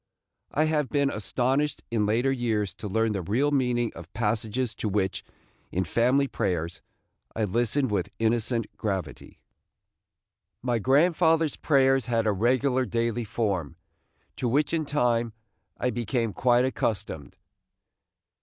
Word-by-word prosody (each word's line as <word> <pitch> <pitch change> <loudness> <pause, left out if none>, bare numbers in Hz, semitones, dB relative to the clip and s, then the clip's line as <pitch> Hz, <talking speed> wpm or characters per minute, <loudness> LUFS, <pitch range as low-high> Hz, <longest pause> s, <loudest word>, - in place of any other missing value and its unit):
I 155 - +2
have 150 -4 +1
been 140 0 +1
astonished 130 +9 -1
in 105 -3 +1
later 120 +5 +2
years 110 -7 -1
to 105 - -7
learn 110 +3 +1
the 100 -2 -2
real 120 - +1
meaning 125 -4 +1
of 85 +2 -11
passages 115 +2 -1
to 110 - -2
which, 95 -2 -1 0.5
in 95 - 0
family 125 - +2
prayers, 85 -8 -2 0.5
I 110 - 0
listened 120 +5 +1
with 95 -4 -1
innocent 115 +1 0
gravity. 95 -9 -4 1.2
My 120 -2 +1
grandfather's 160 - +3
prayers 135 -3 +3
had 115 -2 +1
a 105 - +3
regular 125 +5 +2
daily 115 0 -1
form, 100 - -2 0.6
to 125 - -1
which 145 +6 +1
in 160 -2 0
time, 120 -5 +1 0.4
I 125 - 0
became 115 -1 -1
quite 125 0 +3
accustomed. 105 - -3
120 Hz, 130 wpm, -27 LUFS, 105-130 Hz, 1.2 s, grandfather's